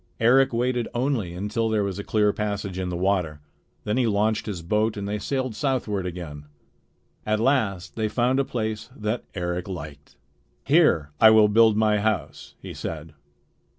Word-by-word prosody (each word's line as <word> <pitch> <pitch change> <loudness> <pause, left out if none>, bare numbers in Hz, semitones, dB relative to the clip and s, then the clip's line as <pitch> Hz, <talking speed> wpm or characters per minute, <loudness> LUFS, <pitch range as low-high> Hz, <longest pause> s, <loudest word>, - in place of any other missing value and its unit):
Eric 130 +4 +4
waited 120 0 0
only 120 -9 -1
until 105 +4 -1
there 110 -2 +1
was 100 0 -3
a - - -4
clear 105 -1 +2
passage 100 -3 -3
in 90 -1 -2
the 90 - -3
water. 90 -5 0 0.4
Then 105 +2 -1
he 125 -2 +2
launched 110 +1 0
his 90 -5 -5
boat, 105 +5 0
and 100 0 -4
they 105 +1 -2
sailed 130 0 -2
southward 110 -6 -1
again. 80 -5 -7 0.8
At 110 0 0
last 110 -8 0
they 110 -1 0
found 125 +4 +1
a - - +3
place 110 -4 -4
that 110 +1 -3
Eric 90 0 -3
liked. 75 -6 -8 0.5
"Here 140 - +3
I 110 - +8
will 110 -1 +6
build 110 0 +5
my 105 -1 +3
house," 110 +1 -3
he - - -8
said. 80 -1 -6
105 Hz, 170 wpm, -24 LUFS, 95-115 Hz, 0.8 s, I